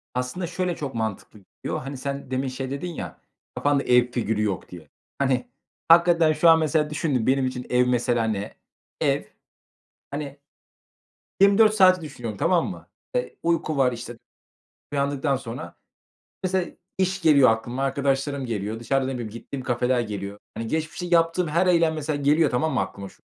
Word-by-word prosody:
Aslında 125 Hz, +8 st, -2 dB
şöyle 180 Hz, 0 st, -2 dB
çok 140 Hz, -6 st, -5 dB
mantıklı 110 Hz, -1 st, -4 dB, 0.2 s
Yo, -, -, -2 dB
hani, 135 Hz, +1 st, -6 dB
sen 140 Hz, 0 st, -5 dB
demin 130 Hz, +1 st, -1 dB
şey 130 Hz, 0 st, -5 dB
dedin 165 Hz, +5 st, -4 dB
ya, -, -, -7 dB, 0.3 s
"Kafanda 145 Hz, -1 st, +1 dB
ev 125 Hz, 0 st, +3 dB
figürü 110 Hz, -3 st, -1 dB
yok." 100 Hz, -4 st, -2 dB
diye. 85 Hz, -5 st, -11 dB, 0.3 s
Hani, 130 Hz, -3 st, +1 dB, 0.4 s
hakikaten 170 Hz, -1 st, +6 dB
şu 160 Hz, +2 st, +4 dB
an 160 Hz, -, +7 dB
mesela 155 Hz, -1 st, +1 dB
düşündüm 145 Hz, -6 st, -1 dB
benim 135 Hz, 0 st, +3 dB
için 125 Hz, -1 st, -5 dB
ev, 125 Hz, 0 st, +3 dB
mesela 120 Hz, -1 st, +1 dB
ne? 105 Hz, -2 st, -2 dB, 0.5 s
Ev, -, -, +2 dB, 0.9 s
hani, 140 Hz, -1 st, -5 dB, 1.0 s
24 205 Hz, +2 st, +6 dB
saati 185 Hz, -3 st, +5 dB
düşünüyorum, 120 Hz, -9 st, -6 dB
tamam 170 Hz, 0 st, +2 dB
mı? -, -, -9 dB, 0.3 s
E, -, -, -1 dB
uyku 165 Hz, -3 st, 0 dB
var, 130 Hz, -2 st, +4 dB
işte, 120 Hz, 0 st, -7 dB, 0.8 s
uyandıktan 140 Hz, 0 st, 0 dB
sonra 125 Hz, -1 st, -7 dB, 0.7 s
mesela 185 Hz, -1 st, 0 dB, 0.3 s
iş 190 Hz, 0 st, 0 dB
geliyor 140 Hz, -6 st, +6 dB
aklıma, 120 Hz, +4 st, -2 dB
arkadaşlarım 135 Hz, 0 st, 0 dB
geliyor. 110 Hz, 0 st, -3 dB
Dışarıda 135 Hz, +2 st, 0 dB
ne 135 Hz, -, -3 dB
bileyim 120 Hz, -4 st, -5 dB
gittiğim 130 Hz, +4 st, -7 dB
kafeler 125 Hz, +1 st, +1 dB
geliyor. 100 Hz, -3 st, -5 dB, 0.2 s
Hani, 115 Hz, -, -4 dB
geçmişte 160 Hz, +6 st, -3 dB
yaptığım 170 Hz, 0 st, +2 dB
her 170 Hz, +4 st, +2 dB
eylem 170 Hz, -3 st, +3 dB
mesela 155 Hz, -1 st, -2 dB
geliyor 150 Hz, +1 st, +4 dB
tamam 140 Hz, +6 st, 0 dB
mı? -, -, +2 dB
Aklıma 100 Hz, +1 st, -5 dB
şu, -, -, -22 dB
135 Hz, 160 wpm, -24 LUFS, 120-160 Hz, 1.0 s, an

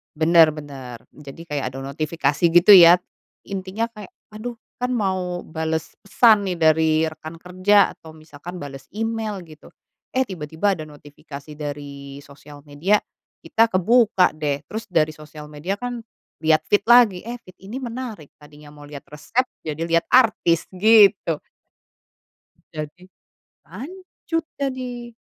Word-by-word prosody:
Bener 160 Hz, 0 st, +5 dB
bener 135 Hz, -6 st, -9 dB
jadi 150 Hz, +2 st, -12 dB
kayak 145 Hz, -2 st, -2 dB
ada 135 Hz, -, -7 dB
notifikasi 150 Hz, 0 st, -2 dB
gitu 175 Hz, +3 st, +5 dB
ya. 175 Hz, 0 st, +8 dB, 0.5 s
Intinya 195 Hz, +4 st, -3 dB
kayak 210 Hz, -4 st, -12 dB, 0.2 s
aduh 215 Hz, +3 st, -7 dB, 0.2 s
kan 250 Hz, 0 st, -2 dB
mau 185 Hz, -5 st, -2 dB
bales 160 Hz, 0 st, -4 dB
pesan 215 Hz, 0 st, +4 dB
nih 180 Hz, -2 st, -3 dB
dari 160 Hz, 0 st, +3 dB, 0.2 s
rekan 155 Hz, +1 st, -11 dB
kerja 185 Hz, +3 st, +3 dB
atau 160 Hz, -1 st, -14 dB
misalkan 155 Hz, +3 st, -11 dB
bales 135 Hz, -2 st, -9 dB
email 220 Hz, -2 st, -3 dB
gitu, 155 Hz, -3 st, -16 dB, 0.4 s
eh 260 Hz, -, +2 dB
tiba-tiba 185 Hz, -, -2 dB
ada 155 Hz, -, -7 dB
notifikasi 145 Hz, 0 st, -12 dB
dari 140 Hz, -2 st, -7 dB
sosial 145 Hz, +1 st, -15 dB
media, 170 Hz, +9 st, +1 dB, 0.4 s
kita 225 Hz, -, +2 dB
kebuka 200 Hz, -1 st, +3 dB
deh, 145 Hz, -2 st, -2 dB
terus 220 Hz, +1 st, -6 dB
dari 160 Hz, -3 st, +2 dB
sosial 150 Hz, 0 st, -12 dB
media 150 Hz, +6 st, -4 dB
kan 245 Hz, -1 st, -5 dB, 0.4 s
liat 155 Hz, 0 st, +4 dB
feed 205 Hz, 0 st, +3 dB
lagi, 230 Hz, -6 st, +5 dB
eh 240 Hz, +1 st, -6 dB
feed 185 Hz, -, -18 dB
ini 220 Hz, +6 st, -6 dB
menarik, 235 Hz, -, -7 dB
tadinya 150 Hz, 0 st, -16 dB
mau 145 Hz, -, -13 dB
liat 145 Hz, -1 st, -11 dB
resep 150 Hz, -, -2 dB, 0.2 s
jadi 155 Hz, 0 st, -5 dB
liat 165 Hz, 0 st, +1 dB
artis, 215 Hz, -9 st, +3 dB
gitu. 200 Hz, -5 st, +4 dB, 1.3 s
Jadi 155 Hz, +2 st, -8 dB, 0.7 s
lanjut 330 Hz, -, -6 dB
jadi. 250 Hz, -3 st, -5 dB
170 Hz, 135 wpm, -22 LUFS, 150-215 Hz, 1.3 s, ya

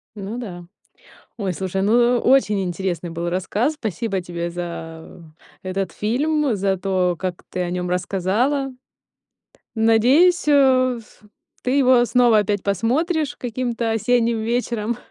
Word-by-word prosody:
Ну 205 Hz, +3 st, -6 dB
да. 175 Hz, -8 st, -7 dB, 0.7 s
Ой, 195 Hz, -4 st, -2 dB
слушай, 190 Hz, +2 st, -3 dB
ну 240 Hz, +3 st, +3 dB
очень 235 Hz, -6 st, +3 dB
интересный 175 Hz, -1 st, -3 dB
был 170 Hz, +1 st, -3 dB
рассказ. 205 Hz, -, -1 dB
Спасибо 210 Hz, -, -3 dB
тебе 170 Hz, -1 st, -4 dB
за 170 Hz, -1 st, -7 dB, 0.4 s
этот 185 Hz, -1 st, -3 dB
фильм, 275 Hz, +3 st, 0 dB
за 195 Hz, -1 st, 0 dB
то, 185 Hz, -2 st, 0 dB
как 185 Hz, -2 st, -4 dB
ты 185 Hz, -, -5 dB
о 175 Hz, -, -2 dB
нём 180 Hz, 0 st, -3 dB
рассказала. 210 Hz, +10 st, 0 dB, 1.0 s
Надеюсь, 250 Hz, +11 st, +4 dB
э, 260 Hz, -3 st, +4 dB
ф 215 Hz, -, -21 dB, 0.4 s
ты 250 Hz, -, -1 dB
его 255 Hz, -2 st, +5 dB
снова 240 Hz, -3 st, +4 dB
опять 205 Hz, -1 st, 0 dB
посмотришь 290 Hz, -, 0 dB
каким-то 235 Hz, -1 st, -2 dB
осенним 230 Hz, +1 st, +1 dB
вечером 235 Hz, -1 st, -1 dB
220 Hz, 125 wpm, -21 LUFS, 185-250 Hz, 1.0 s, его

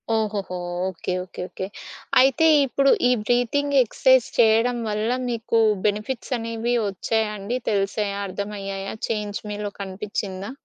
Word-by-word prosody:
ఓహోహో! 205 Hz, -4 st, -2 dB, 0.3 s
Okay. 180 Hz, 0 st, -4 dB
Okay, 185 Hz, -, -9 dB
okay. 190 Hz, -, -5 dB, 0.5 s
అయితే 270 Hz, +4 st, +4 dB, 0.2 s
ఇప్పుడు 275 Hz, +1 st, +3 dB, 0.2 s
ఈ -, -, +4 dB
బ్రీతింగ్ 245 Hz, +5 st, +1 dB
ఎక్సర్సైజ్ 260 Hz, +2 st, +3 dB
చేయడం 230 Hz, +2 st, +4 dB
వల్ల 215 Hz, +2 st, -1 dB, 0.2 s
మీకు 230 Hz, -1 st, 0 dB, 0.3 s
బెనిఫిట్స్ 220 Hz, +6 st, -3 dB
అనేవి 230 Hz, +1 st, -2 dB
వచ్చాయ 220 Hz, +3 st, 0 dB
అండి? 215 Hz, +6 st, -3 dB
తెలిసాయా? 200 Hz, 0 st, -1 dB
అర్థమయ్యాయా? 195 Hz, 0 st, -5 dB, 0.2 s
చేంజ్ 210 Hz, -2 st, -2 dB
మీలో 205 Hz, 0 st, -4 dB
కనిపిచ్చిందా? 195 Hz, +1 st, -5 dB
215 Hz, 120 wpm, -23 LUFS, 200-240 Hz, 0.5 s, అయితే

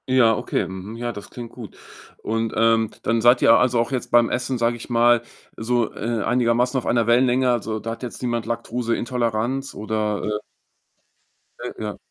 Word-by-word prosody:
Ja, 120 Hz, -4 st, +5 dB
okay. 100 Hz, -, -2 dB
Mhm. 95 Hz, +4 st, -7 dB
Ja, 120 Hz, 0 st, -3 dB
das 105 Hz, -2 st, -9 dB
klingt 120 Hz, -2 st, -8 dB
gut. 115 Hz, -5 st, -11 dB, 0.5 s
Und, 115 Hz, 0 st, -1 dB
ähm, 115 Hz, -1 st, +3 dB
dann 115 Hz, +1 st, +1 dB
seid 120 Hz, +2 st, +5 dB
ihr, 115 Hz, -, +7 dB
also, 125 Hz, -1 st, +3 dB
auch 115 Hz, +3 st, 0 dB
jetzt 130 Hz, -2 st, -3 dB
beim 120 Hz, -1 st, +5 dB
Essen, 125 Hz, +1 st, -1 dB
sag 115 Hz, 0 st, +1 dB
ich 120 Hz, +1 st, -9 dB
mal, 120 Hz, 0 st, +4 dB, 0.4 s
so, 120 Hz, 0 st, 0 dB
äh, 115 Hz, -1 st, -2 dB
einigermaßen 125 Hz, +2 st, +1 dB
auf 125 Hz, -, -3 dB
einer 120 Hz, -2 st, +2 dB
Wellenlänge? 125 Hz, +2 st, +3 dB
Also, 110 Hz, -2 st, -2 dB
da 115 Hz, +2 st, -5 dB
hat 115 Hz, -, -8 dB
jetzt 120 Hz, -, -6 dB
niemand 120 Hz, -3 st, -2 dB
Laktoseintoleranz 120 Hz, +2 st, -2 dB
oder? 105 Hz, 0 st, -2 dB
Äh 105 Hz, 0 st, -2 dB, 1.2 s
Äh, -, -, -6 dB
ja. -, -, -4 dB
115 Hz, 180 wpm, -22 LUFS, 110-120 Hz, 1.2 s, ihr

